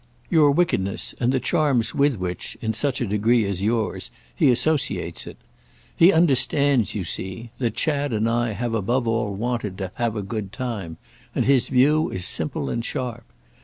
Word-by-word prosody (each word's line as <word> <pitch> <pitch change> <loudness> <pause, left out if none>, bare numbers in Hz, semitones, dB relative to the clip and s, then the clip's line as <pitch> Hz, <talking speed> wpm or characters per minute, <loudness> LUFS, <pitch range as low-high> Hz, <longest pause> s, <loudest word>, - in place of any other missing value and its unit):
"Your 155 -4 +5
wickedness 140 - 0
and 125 0 +2
the 130 - +1
charms 130 -2 +1
with 140 -3 +2
which, 90 -2 -5
in 110 - -2
such 130 +5 0
a - - +1
degree 110 +2 +2
as 100 -2 -3
yours, 110 +1 -1 0.3
he - - +4
associates 145 +4 +1
it. - - -9 0.6
He 170 +3 +6
understands, 140 - +2
you 100 - -2
see, 95 +7 -4
that 115 -4 -1
Chad 145 -3 0
and 110 0 0
I 115 -1 0
have 120 +2 -3
above 115 +4 0
all 115 -3 0
wanted 110 -3 -3
to 95 -2 -4
have 115 -2 -1
a 105 - -3
good 100 -1 -5
time, 105 -9 -5 0.4
and - - +1
his 135 -2 +3
view 145 +5 +3
is 90 -1 -2
simple - - -1
and 115 - -2
sharp. 120 -3 -4
120 Hz, 175 wpm, -23 LUFS, 105-135 Hz, 0.6 s, He